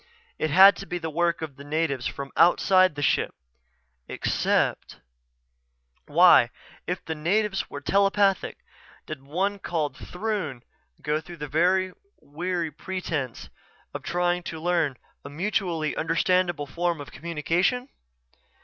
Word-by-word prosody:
It 155 Hz, -, 0 dB
had 190 Hz, +5 st, +8 dB
to 195 Hz, -, -8 dB
be 175 Hz, -, -3 dB
the 160 Hz, -2 st, -5 dB
work 170 Hz, +1 st, 0 dB
of 145 Hz, -4 st, -7 dB
the 140 Hz, -, -10 dB
natives 145 Hz, -4 st, -1 dB
from 140 Hz, 0 st, -6 dB
outside 185 Hz, +1 st, +4 dB
the 145 Hz, -, -3 dB
ship. -, -, +1 dB, 0.7 s
Except.... -, -, -1 dB, 1.1 s
Why, 150 Hz, -6 st, +6 dB, 0.4 s
if 180 Hz, +1 st, -3 dB
the 160 Hz, -, -3 dB
natives 195 Hz, +6 st, 0 dB
were 145 Hz, -, -7 dB
telepathic, 195 Hz, +2 st, +2 dB, 0.5 s
did 155 Hz, -2 st, -6 dB
the 135 Hz, -, -23 dB
one 195 Hz, +6 st, -1 dB
called 160 Hz, -5 st, -2 dB
Throon 180 Hz, -, -4 dB, 0.4 s
go 150 Hz, +1 st, 0 dB
through 170 Hz, +2 st, -11 dB
the 180 Hz, +5 st, +1 dB, 0.3 s
weary 170 Hz, +2 st, -3 dB
pretense 165 Hz, -11 st, -4 dB, 0.4 s
of -, -, -5 dB
trying 175 Hz, +1 st, 0 dB
to 165 Hz, -2 st, -7 dB
learn 165 Hz, -5 st, 0 dB, 0.3 s
a 140 Hz, -, -8 dB
mutually 170 Hz, -1 st, -1 dB
understandable 175 Hz, -1 st, +1 dB
form 170 Hz, +3 st, -2 dB
of 145 Hz, -, -9 dB
communication? 170 Hz, -, -1 dB
170 Hz, 130 wpm, -25 LUFS, 150-185 Hz, 1.1 s, had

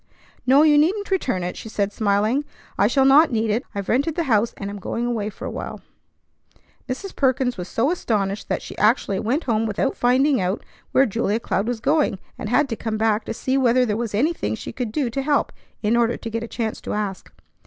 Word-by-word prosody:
"No, 275 Hz, +4 st, +6 dB
you 300 Hz, -1 st, +6 dB
needn't 395 Hz, +7 st, +1 dB
return 250 Hz, -, 0 dB
it," 180 Hz, -, -3 dB
she 220 Hz, -, -8 dB
said, 205 Hz, -1 st, -1 dB
smiling. 215 Hz, +5 st, +1 dB, 0.3 s
"I 200 Hz, -, +3 dB
shall 265 Hz, +3 st, +3 dB
not 295 Hz, +3 st, +6 dB
need 220 Hz, -2 st, +1 dB
it. 230 Hz, +5 st, 0 dB
I've 200 Hz, -1 st, -4 dB
rented 285 Hz, +6 st, +1 dB
the 340 Hz, -, 0 dB
house, 230 Hz, -5 st, +2 dB
and 200 Hz, -1 st, -5 dB
am 205 Hz, -, -7 dB
going 230 Hz, +5 st, -3 dB
away 225 Hz, -4 st, -1 dB
for -, -, -9 dB
a -, -, -4 dB
while." -, -, -6 dB, 1.1 s
Mrs. 370 Hz, +10 st, -5 dB
Perkins 260 Hz, -2 st, +1 dB
was 180 Hz, -2 st, -6 dB
so 255 Hz, -, +1 dB
astonished 205 Hz, -, -1 dB
that -, -, -1 dB
she -, -, -8 dB
actually 210 Hz, -3 st, +2 dB
went 265 Hz, +9 st, 0 dB
home 225 Hz, -2 st, 0 dB
without 220 Hz, +6 st, -1 dB
finding 260 Hz, +1 st, +3 dB
out 185 Hz, +3 st, -2 dB, 0.3 s
where 270 Hz, -, +5 dB
Julia 220 Hz, -1 st, 0 dB
Cloud 200 Hz, -2 st, -1 dB
was 240 Hz, -2 st, -2 dB
going, 290 Hz, -3 st, +2 dB, 0.2 s
and 210 Hz, -, -6 dB
had 285 Hz, +5 st, +3 dB
to 225 Hz, -, -2 dB
come 220 Hz, -1 st, -3 dB
back 220 Hz, 0 st, +1 dB
to -, -, -3 dB
see 265 Hz, +4 st, 0 dB
whether 250 Hz, 0 st, +4 dB
there 210 Hz, -3 st, -1 dB
was 225 Hz, -2 st, -3 dB
anything 300 Hz, +3 st, 0 dB
she -, -, -7 dB
could 245 Hz, -4 st, -3 dB
do 255 Hz, -1 st, -1 dB
to 275 Hz, -, -2 dB
help, 285 Hz, +1 st, +1 dB, 0.3 s
in 215 Hz, +2 st, +2 dB
order 235 Hz, 0 st, +2 dB
to 230 Hz, -, -6 dB
get 230 Hz, +1 st, -2 dB
a 230 Hz, -, -5 dB
chance 225 Hz, -2 st, -3 dB
to -, -, -4 dB
ask. 205 Hz, -3 st, -4 dB
235 Hz, 225 wpm, -22 LUFS, 210-270 Hz, 1.1 s, No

